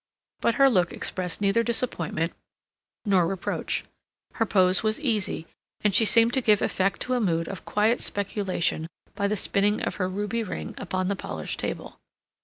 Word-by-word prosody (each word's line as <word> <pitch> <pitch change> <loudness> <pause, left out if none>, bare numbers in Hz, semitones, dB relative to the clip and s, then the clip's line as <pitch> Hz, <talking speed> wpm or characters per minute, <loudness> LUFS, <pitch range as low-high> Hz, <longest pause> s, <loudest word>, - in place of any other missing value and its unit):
But 235 - +1
her 275 -1 +6
look 180 -9 +2
expressed 180 0 -3
neither 200 +3 +3
disappointment 205 -9 0 0.7
nor 190 -5 +3
reproach. 190 0 -2 0.5
Her 225 - 0
pose 185 -1 +4
was 215 0 0
easy, 220 - -1 0.4
and 210 -1 +2
she 225 - +6
seemed 230 +2 +5
to 265 - +2
give 210 -4 +4
effect 190 0 0
to 255 - 0
a 250 - +1
mood 165 -5 0
of 195 - -7
quiet 215 +3 +1
speculation 190 -5 -1 0.3
by 200 -1 -1
the 210 - 0
spinning 205 +1 +1
of - - -2
her 185 -2 -1
ruby 205 +4 -2
ring 215 - -5
upon 185 -1 -2
the 200 - 0
polished - - -5
table. - - -5
200 Hz, 170 wpm, -26 LUFS, 185-225 Hz, 0.7 s, her